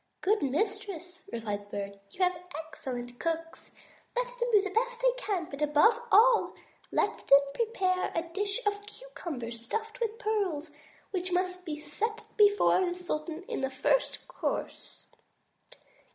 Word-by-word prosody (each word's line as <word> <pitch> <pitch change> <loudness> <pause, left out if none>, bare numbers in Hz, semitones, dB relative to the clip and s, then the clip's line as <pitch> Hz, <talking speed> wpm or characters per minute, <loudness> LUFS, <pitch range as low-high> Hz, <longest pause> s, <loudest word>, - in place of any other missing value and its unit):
"Good 420 +3 +3
mistress," 360 - -2
replied 210 -3 -3
the - - -5
Bird, 200 0 -5
"you 370 - -1
have 360 0 +3 0.2
excellent 250 -6 -6
cooks; 330 0 -3 0.5
let - - +2
them 485 0 +1
do 415 -3 +6
the 400 - -3
best 485 +3 0
they - - +4
can. 405 -8 -2
But 280 -1 -8
above 300 +11 +5
all, 455 +3 +6 0.4
let - - 0
them 275 - +9
prepare 385 -6 0
a 330 - +1
dish 400 +7 -2
of 410 0 0
cucumbers 280 - -7
stuffed 445 - -3
with 455 -2 -1
pearls, 395 -10 -1 0.4
which 370 -1 -2
must 365 0 -1
be 300 -1 -3
set 420 +10 -3
before 410 -2 +5
the 350 -1 -1
sultan 335 -1 -4
in 360 - -4
the 265 - 0
first 270 - +1
course." - - -4
365 Hz, 150 wpm, -30 LUFS, 300-430 Hz, 0.5 s, them